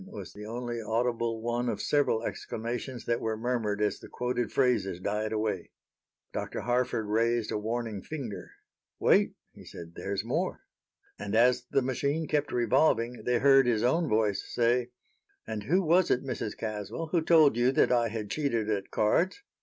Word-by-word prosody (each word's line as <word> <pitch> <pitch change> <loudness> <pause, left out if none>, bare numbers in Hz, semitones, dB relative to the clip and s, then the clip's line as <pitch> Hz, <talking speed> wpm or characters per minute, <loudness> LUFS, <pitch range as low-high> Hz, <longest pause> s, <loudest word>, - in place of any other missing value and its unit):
was 215 - -8
the 105 +1 -9
only 120 0 -4
audible 115 0 -1
one 120 +1 -1
of - - -2
several 145 -6 +1
exclamations 120 +2 -5
that 115 0 0
were 110 -1 -1
murmured 110 -3 -1
as 105 -2 0
the - - -11
quoted 125 -1 -2
phrases 120 -9 +1
died 105 +3 -2
away. 105 -5 -2 0.6
Dr. - - -4
Harford 120 -1 0
raised 115 +1 +1
a - - 0
warning 110 -2 -3
finger. 115 - -6 0.5
"Wait," - - +3 0.2
he - - -14
said; 85 0 -10
"there's 100 +3 -3
more." 120 - -1 0.6
And 105 +1 -3
as 125 +2 +4
the 135 - +2
machine 140 +5 -1
kept 150 -1 0
revolving 120 0 +2
they 125 0 +2
heard 135 0 +5
his 115 -2 +2
own 160 +6 +2
voice 105 -2 +1
say: 120 +1 +1 0.6
"And 110 -2 -5
who 180 - +2
was 175 +2 +4
it, 125 - +2
Mrs. 130 -5 -4
Caswell, 110 +9 -4
who 170 - +2
told 155 -5 +5
you 120 +2 +3
that - - +3
I 120 -1 +3
had 110 -2 -5
cheated 120 -8 0
at 100 -2 -2
cards?" 180 - +1
120 Hz, 170 wpm, -29 LUFS, 110-125 Hz, 0.6 s, heard